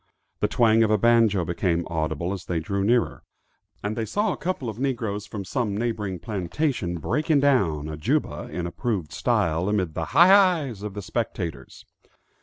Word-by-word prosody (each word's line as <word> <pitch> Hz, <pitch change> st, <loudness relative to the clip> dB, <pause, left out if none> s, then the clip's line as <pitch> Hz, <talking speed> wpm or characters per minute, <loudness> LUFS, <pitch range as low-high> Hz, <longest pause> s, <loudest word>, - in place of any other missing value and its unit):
The 105 Hz, -, +2 dB
twang 115 Hz, 0 st, +3 dB
of 110 Hz, -, +3 dB
a 110 Hz, -, +4 dB
banjo 115 Hz, -4 st, +3 dB
became 85 Hz, 0 st, 0 dB
audible 80 Hz, +2 st, -2 dB
as 95 Hz, -2 st, -7 dB
they 85 Hz, -2 st, -1 dB
drew 100 Hz, +5 st, -2 dB
nearer, 120 Hz, +3 st, +1 dB, 0.6 s
and 105 Hz, +1 st, -2 dB
they 115 Hz, -, -2 dB
saw 205 Hz, -, 0 dB
a -, -, -7 dB
couple 180 Hz, -8 st, -3 dB
of 110 Hz, 0 st, -5 dB
negroes, 115 Hz, -6 st, -2 dB
from 100 Hz, -3 st, -6 dB
some 105 Hz, -1 st, -2 dB
neighboring 105 Hz, -5 st, -2 dB
plantation, 100 Hz, -, -2 dB
"breaking 150 Hz, -, +1 dB
down" 95 Hz, -, +2 dB
a 80 Hz, -1 st, -5 dB
juba 75 Hz, -, -1 dB
in 90 Hz, -, -3 dB
approved 95 Hz, -, -3 dB
style, 85 Hz, +4 st, +1 dB
amid 95 Hz, -6 st, 0 dB
the 80 Hz, -, -3 dB
"hi, 170 Hz, -, +6 dB
hi's" 175 Hz, -, +4 dB
of 105 Hz, -1 st, -6 dB
the 105 Hz, -, -5 dB
spectators. 100 Hz, -5 st, -4 dB
105 Hz, 175 wpm, -25 LUFS, 85-120 Hz, 0.6 s, hi